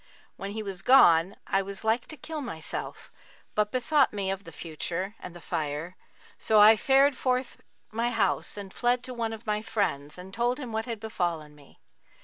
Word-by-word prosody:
When 195 - -6
he 220 0 -4
was 195 -3 -5
gone, 180 -7 +6
I 195 - +1
was 195 +1 -6
like 225 +2 +1
to 310 - -9
kill 315 0 -6
myself, 165 - -6 0.4
but 210 0 +1
bethought 265 +3 +3
me 195 -2 -1
of 195 +1 -5
the 165 - -9
Future 170 +5 -4
and 180 - -9
the - - -9
Fire; 155 +3 -3 0.4
so 215 -1 +4
I 215 +2 +9
fared 270 +4 +4
forth 255 0 -1 0.3
my 230 +2 0
house 210 -3 0
and 195 -2 -8
fled 245 0 +1
to 255 - -7
one 230 -2 -2
of 225 +1 -8
my 210 -1 0
friends 150 -10 -2
and 185 +2 -10
told 240 +3 0
him 255 -5 -6
what 220 +2 -2
had 230 -3 -4
befallen 175 -8 -3
me. 145 -2 -19
210 Hz, 190 wpm, -28 LUFS, 180-240 Hz, 0.4 s, I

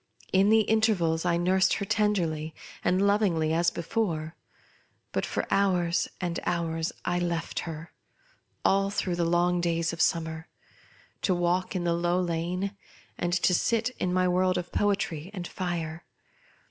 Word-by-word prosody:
In 195 +2 +5
the 220 0 +6
intervals, 200 -7 +2
I 170 -1 +2
nursed 185 +2 +3
her 200 - -3
tenderly 170 -8 0 0.3
and 185 +2 +2
lovingly 185 -7 +2
as 170 +1 +3
bt 170 - -6
fore; 165 -8 -1 0.8
but - - -1
for - - -2
hours 180 -3 +2
and 175 -2 -2
hours 165 -2 -1
I 175 0 +1
left 170 -2 -2
her— 160 +1 -8 0.7
all 195 0 +3
through 195 -2 -1
the 170 - +1
long 175 +1 +2
days 170 -1 0
of 165 - -3
summer 160 -1 0 0.4
— - - -30
to 185 - +2
walk 175 +2 0
in 180 - -1
the 170 -1 +1
Low 175 +1 +1
Lane, 180 +3 -2 0.4
and 175 - -1
to 180 +1 +2
sit 230 +6 +1
in 180 - 0
my 185 0 +2
world 185 +1 +2
of 175 -1 -4
poetry 190 -5 0
and 175 -2 -4
fire. 170 -3 -4
175 Hz, 160 wpm, -28 LUFS, 170-190 Hz, 0.8 s, the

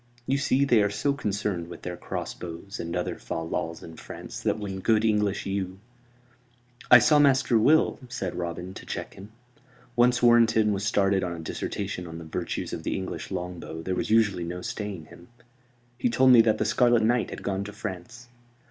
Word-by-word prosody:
You 135 +2 +1
see, 140 0 +2
they 120 -5 +4
are 105 - +2
so 110 +8 0
concerned 100 -8 -2
with 85 - -10
their 90 0 -4
crossbows 90 +2 -6
and 85 0 -4
other - - -3
fal 80 0 -4
lals 80 0 -4
in 80 -1 -11
France - - -8
that - - 0
when 100 -3 -5
good 110 +2 +2
English 105 -2 +1
yew 95 -1 -3 0.6
" 120 0 -35 0.3
"I 120 - +11
saw 150 +5 +5
Master 135 -3 +4
Will," 155 +8 +3
said 125 +1 -4
Robin, 90 +1 -5
to - - -10
check - - -5
him. 100 +2 -12 0.6
Once 125 0 +3
Warrenton 115 -3 +5
was 100 0 -3
started 100 -2 +2
on 90 -1 -2
a - - -8
dissertation 90 +3 -4
on 80 0 -8
the 85 - -8
virtues 80 - -4
of - - -4
the - - -2
English 95 -1 -5
longbow 90 -3 -6
there 95 - -2
was - - -2
usually 105 -5 +3
no 90 +1 -5
staying 100 -6 -5
him. 85 +3 -15 0.7
"He 245 - +1
told 130 - +5
me 120 -2 +9
that 110 -1 +2
the 110 - 0
Scarlet 120 +1 +3
Knight 120 +1 +2
had - - -8
gone 100 0 -2
to 105 - -7
France." 105 +3 -7
105 Hz, 195 wpm, -26 LUFS, 90-120 Hz, 0.7 s, I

